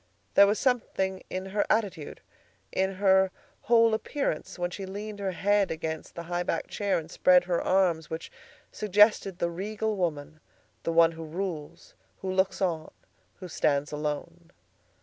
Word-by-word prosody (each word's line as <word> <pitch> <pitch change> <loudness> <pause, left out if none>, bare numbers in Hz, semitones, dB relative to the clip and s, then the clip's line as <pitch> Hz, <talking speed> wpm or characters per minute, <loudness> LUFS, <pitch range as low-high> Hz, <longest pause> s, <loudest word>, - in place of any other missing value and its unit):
There 200 - +7
was 210 +2 +1
something 190 -7 0
in 185 +1 -4
her 205 +2 0
attitude, 195 -8 -1 0.5
in 190 0 0
her 190 0 +4 0.3
whole 230 -1 +4
appearance 220 - -2
when 175 0 -2
she 195 +1 -6
leaned 205 +2 -6
her 195 -2 -2
head 205 +1 +2
against 160 -1 -5
the 170 - -5
high 175 +1 -2
backed 175 - -2
chair 205 -1 0
and 160 0 -6
spread 180 -1 +5
her 175 -1 0
arms, 175 -4 +1
which 160 +1 -6 0.4
suggested 210 -2 +3
the 170 -1 -1
regal 210 +4 -2
woman, 155 -4 -3 0.4
the 165 - -2
one 165 0 +5
who 165 0 -8
rules, 160 -2 -6 0.2
who 190 - -4
looks 190 +1 +1
on, 165 -4 -1 0.5
who 185 - -9
stands 145 -3 0
alone. 150 +3 -4
185 Hz, 155 wpm, -28 LUFS, 165-200 Hz, 0.5 s, There